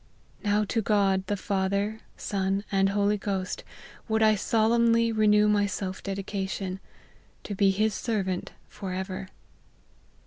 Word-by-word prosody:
Now 210 0 +2
to 225 +2 0
God, 195 -3 +2
the 205 - -1
Father, 200 +3 -1 0.2
Son, 195 0 -1
and 195 0 +3
Holy 205 +1 +1
Ghost, 195 -2 -3 0.4
would 220 -1 +2
I 215 0 +6
solemnly 230 +2 +3
renew 210 -1 +4
my 205 -1 +3
self 190 -1 -4
dedication, 195 -1 -3 0.6
to' 205 - -5
be 200 0 +3
his 210 +2 +1
ser 215 0 -1
vant 185 -1 -3 0.2
for 190 -2 -6
ever." 190 0 -4
200 Hz, 135 wpm, -27 LUFS, 190-215 Hz, 0.6 s, I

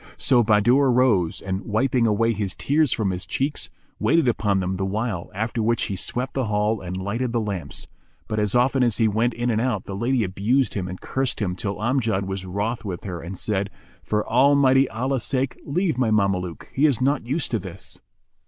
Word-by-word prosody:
So 125 -4 +3
Bahadur 120 +6 +4
rose 115 -10 +2
and, 95 0 -3
wiping 115 +2 +1
away 115 +2 +2
his 100 -4 -3
tears 150 -1 +2
from 105 -5 0
his 90 0 -4
cheeks, 140 +2 -1 0.3
waited 165 -5 +3
upon 105 -4 +1
them 95 0 -2
the 95 - -2
while, 100 -2 -2
after 115 +3 -2
which 115 +1 +1
he 100 - -2
swept 125 +7 -2
the 135 -2 0
hall 105 +1 0
and 90 0 -5
lighted 115 +6 -2
the 120 - +2
lamps; 100 -5 -4 0.4
but 110 - -2
as 105 0 0
often 130 +2 +3
as 120 -4 +3
he 115 - +3
went 115 +3 +1
in 120 +1 0
and 110 0 +1
out, 115 -6 -1
the 95 - -5
lady 120 +3 +1
abused 105 +8 +1
him 95 -3 -3
and 90 0 -7
cursed 135 -1 -2
him 90 -5 -1
till 100 +1 -3
Amjad 115 -4 0
was 95 -1 -5
wroth 105 +6 -2
with 95 -5 -5
her 90 -4 -5
and 90 +3 -7
said, 100 0 -1 0.3
"For 105 0 -1
Almighty 135 +2 +4
Allah's 125 +2 -1
sake 135 -1 -1
leave 160 -2 0
my 125 -3 +2
Mameluke; 100 -5 0
he 145 +4 +4
is 135 -7 +1
not 135 -2 +1
used 145 +4 0
to 115 - +1
this." 95 -1 -8
110 Hz, 205 wpm, -23 LUFS, 100-130 Hz, 0.4 s, Bahadur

